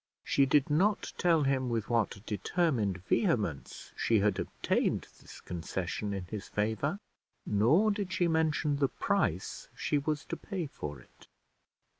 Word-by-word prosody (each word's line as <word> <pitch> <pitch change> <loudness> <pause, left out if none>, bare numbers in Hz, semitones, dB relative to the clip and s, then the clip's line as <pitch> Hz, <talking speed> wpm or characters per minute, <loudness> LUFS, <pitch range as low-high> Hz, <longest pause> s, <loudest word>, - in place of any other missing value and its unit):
She 140 -1 +3
did 145 +1 +3
not 195 +7 +2
tell 165 -4 +4
him 135 -2 +1
with 115 -2 -1
what 115 -3 0
determined 105 - 0
vehemence 105 - 0
she 115 - +2
had 105 0 +2
obtained - - 0
this - - -12
concession 90 +4 -4
in 95 -2 -3
his 100 +2 -6
favour, 110 - -1 0.5
nor 140 - +4
did 200 -3 -3
she 185 -2 +2
mention 155 -2 +1
the 140 -2 +2
price - - -1
she 145 - 0
was 150 +1 -2
to - - -4
pay 190 -5 -4
for 75 - -7
it. - - -20
135 Hz, 145 wpm, -31 LUFS, 105-160 Hz, 0.5 s, tell